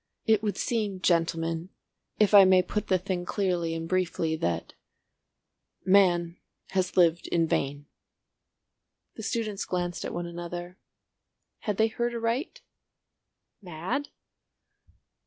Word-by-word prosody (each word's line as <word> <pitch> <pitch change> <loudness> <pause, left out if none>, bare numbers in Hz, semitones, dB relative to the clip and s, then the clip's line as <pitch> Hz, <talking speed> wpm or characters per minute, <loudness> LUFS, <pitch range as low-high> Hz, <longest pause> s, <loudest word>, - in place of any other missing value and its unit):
It 220 -2 +4
would 210 -2 -2
seem, 210 -5 -1
gentlemen, 165 -1 0 0.5
if 210 -1 +4
I 200 -1 +10
may 185 -1 +5
put 210 +3 -3
the 185 - +3
thing 185 0 -3
clearly 175 -4 -1
and 165 0 -4
briefly, 170 -3 0
that—Man 175 - -2 0.3
has 185 -1 -1
lived 170 -1 +4
in 165 -1 +2
vain." 145 -2 -1 1.3
The - - -9
students 220 -2 -2
glanced 175 -1 -3
at - - -4
one 175 0 -4
another. 175 +1 -7 0.8
Had 210 -2 -3
they 220 - +4
heard 235 +2 -2
aright? 235 +7 -2 1.0
Mad? 185 - -4
180 Hz, 115 wpm, -28 LUFS, 170-205 Hz, 1.3 s, I